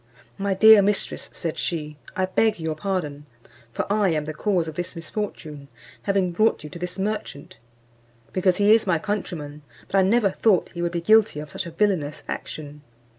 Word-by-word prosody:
"My 195 Hz, -1 st, 0 dB
dear 220 Hz, +1 st, +8 dB
mistress," 200 Hz, +1 st, -1 dB
said 165 Hz, -2 st, -4 dB
she, 150 Hz, -3 st, -3 dB, 0.2 s
"I 190 Hz, -2 st, +1 dB
beg 215 Hz, +2 st, +1 dB
your 160 Hz, -1 st, -2 dB
pardon, 155 Hz, -4 st, -3 dB, 0.4 s
for -, -, -2 dB
I 205 Hz, -2 st, +3 dB
am 155 Hz, -3 st, 0 dB
the 155 Hz, -, -4 dB
cause 180 Hz, 0 st, 0 dB
of 160 Hz, -, -5 dB
this 175 Hz, +3 st, -5 dB
misfortune, 160 Hz, -5 st, -6 dB, 0.3 s
having 195 Hz, -3 st, +1 dB
brought 215 Hz, +2 st, +2 dB
you 150 Hz, -, -9 dB
to 170 Hz, -, -8 dB
this 180 Hz, +1 st, -5 dB
merchant, 195 Hz, -7 st, -4 dB, 0.8 s
because 185 Hz, -1 st, +2 dB
he 205 Hz, +1 st, +5 dB
is 225 Hz, -2 st, +3 dB
my 175 Hz, -3 st, +3 dB
countryman: 160 Hz, -6 st, -4 dB, 0.3 s
but 195 Hz, -, +2 dB
I -, -, +6 dB
never 200 Hz, +1 st, +3 dB
thought 200 Hz, -2 st, +2 dB
he 170 Hz, -, -5 dB
would 175 Hz, 0 st, 0 dB
be 170 Hz, -, -1 dB
guilty 215 Hz, -3 st, +4 dB
of 150 Hz, -1 st, -8 dB
such -, -, -4 dB
a -, -, -7 dB
villainous 165 Hz, -5 st, 0 dB
action. 150 Hz, -1 st, -6 dB
180 Hz, 185 wpm, -24 LUFS, 155-205 Hz, 0.8 s, dear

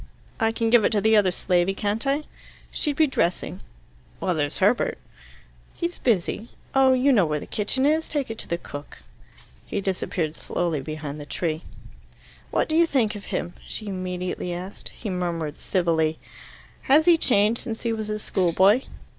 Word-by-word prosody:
"I 225 Hz, 0 st, +3 dB
can 225 Hz, 0 st, 0 dB
give 240 Hz, -2 st, +6 dB
it -, -, +4 dB
to 210 Hz, -, +3 dB
the 220 Hz, +1 st, +4 dB
other 205 Hz, -3 st, +5 dB
slavey, 180 Hz, +1 st, +1 dB
can't 210 Hz, +5 st, -1 dB
I?" 280 Hz, +2 st, +1 dB, 0.5 s
"She'd 295 Hz, -3 st, -1 dB
be 315 Hz, -, +5 dB
dressing." 185 Hz, -, -1 dB, 0.6 s
"Well, 180 Hz, -, 0 dB
there's 145 Hz, -2 st, -1 dB
Herbert." 205 Hz, +6 st, +2 dB, 0.8 s
"He's 345 Hz, 0 st, -3 dB
busy. 220 Hz, 0 st, 0 dB, 0.2 s
Oh, 265 Hz, -1 st, +5 dB
you 265 Hz, +2 st, +4 dB
know 200 Hz, -8 st, +4 dB
where 150 Hz, 0 st, -1 dB
the -, -, -8 dB
kitchen 240 Hz, +6 st, 0 dB
is. 315 Hz, +2 st, +2 dB
Take 285 Hz, -6 st, -2 dB
it 225 Hz, -, -7 dB
to -, -, -5 dB
the 170 Hz, -, -1 dB
cook." 145 Hz, -4 st, -10 dB, 0.6 s
He -, -, -2 dB
disappeared 180 Hz, -4 st, -2 dB
slowly 165 Hz, -5 st, -2 dB
behind 155 Hz, 0 st, -6 dB
the 145 Hz, -, -8 dB
tree. 160 Hz, -1 st, -2 dB, 0.9 s
"What -, -, +1 dB
do 315 Hz, -, 0 dB
you 335 Hz, +1 st, +5 dB
think 230 Hz, -8 st, +1 dB
of 205 Hz, -, -8 dB
him?" 175 Hz, -, -3 dB
she 215 Hz, -2 st, -5 dB
immediately 180 Hz, -1 st, -3 dB
asked. 180 Hz, +3 st, -6 dB
He 210 Hz, -, -6 dB
murmured 170 Hz, -4 st, -2 dB
civilly. 160 Hz, -4 st, +1 dB, 0.7 s
"Has 300 Hz, +4 st, +6 dB
he 350 Hz, -1 st, +7 dB
changed 225 Hz, -7 st, +2 dB
since 225 Hz, -2 st, -5 dB
he 230 Hz, -1 st, 0 dB
was 215 Hz, -1 st, -4 dB
a 215 Hz, -, -1 dB
schoolboy?" 190 Hz, +3 st, +3 dB
205 Hz, 175 wpm, -25 LUFS, 175-240 Hz, 0.9 s, he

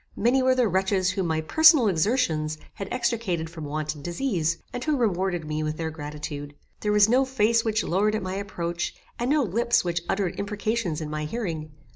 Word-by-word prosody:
Many 245 Hz, +4 st, +3 dB
were 260 Hz, 0 st, +3 dB
the 250 Hz, -2 st, +3 dB
wretches 190 Hz, 0 st, +1 dB
whom 190 Hz, -2 st, -1 dB
my 160 Hz, -1 st, 0 dB
personal 315 Hz, -, +6 dB
exertions 160 Hz, -5 st, +1 dB, 0.2 s
had 195 Hz, -, -6 dB
extricated 225 Hz, -10 st, -1 dB
from 160 Hz, -3 st, -7 dB
want 155 Hz, +1 st, -2 dB
and 145 Hz, -2 st, -12 dB
disease, 170 Hz, -, -1 dB, 0.2 s
and 245 Hz, -, -4 dB
who 305 Hz, -2 st, +1 dB
rewarded 190 Hz, -7 st, 0 dB
me 155 Hz, 0 st, -2 dB
with 155 Hz, 0 st, -2 dB
their 160 Hz, -1 st, -3 dB
gratitude. 150 Hz, -1 st, -6 dB, 0.2 s
There 210 Hz, -, 0 dB
was 210 Hz, 0 st, +6 dB
no 250 Hz, +4 st, +4 dB
face 235 Hz, -3 st, +2 dB
which 220 Hz, -1 st, 0 dB
lowered 210 Hz, +4 st, +1 dB
at 215 Hz, -, -2 dB
my 185 Hz, 0 st, -3 dB
approach, 175 Hz, -3 st, -3 dB, 0.2 s
and 240 Hz, +2 st, -1 dB
no 295 Hz, 0 st, +3 dB
lips 235 Hz, +3 st, +2 dB
which 170 Hz, -1 st, -1 dB
uttered 195 Hz, -3 st, -1 dB
imprecations 205 Hz, -4 st, -2 dB
in 155 Hz, -, -4 dB
my 155 Hz, 0 st, -3 dB
hearing. 160 Hz, -5 st, -4 dB
190 Hz, 195 wpm, -25 LUFS, 160-230 Hz, 0.2 s, personal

